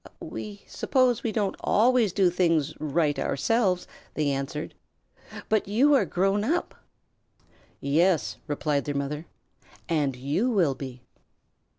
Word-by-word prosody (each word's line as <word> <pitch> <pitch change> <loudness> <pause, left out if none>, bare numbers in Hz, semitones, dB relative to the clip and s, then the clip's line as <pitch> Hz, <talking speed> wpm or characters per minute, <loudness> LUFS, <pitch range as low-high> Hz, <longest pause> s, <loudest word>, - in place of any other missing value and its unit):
"We 205 -1 -7
suppose 255 -4 +1
we 230 - -1
don't 205 -3 -1
always 235 -1 +3
do 185 -1 +3
things 165 -4 +1
right 150 -1 0
ourselves," 185 - +1 0.3
they 150 -2 +1
answered, 140 +2 -4 0.7
"but 215 -3 +1
you 255 +9 +4
are 275 - +4
grown 195 +3 +1
up." 330 +10 -1 1.1
"Yes," 165 +4 +1
replied 145 -1 -1
their 145 - -3
mother. 145 +3 -3 0.6
"And 145 -5 0
you 145 - 0
will 180 - +2
be." 130 -2 -8
175 Hz, 120 wpm, -26 LUFS, 145-215 Hz, 1.1 s, you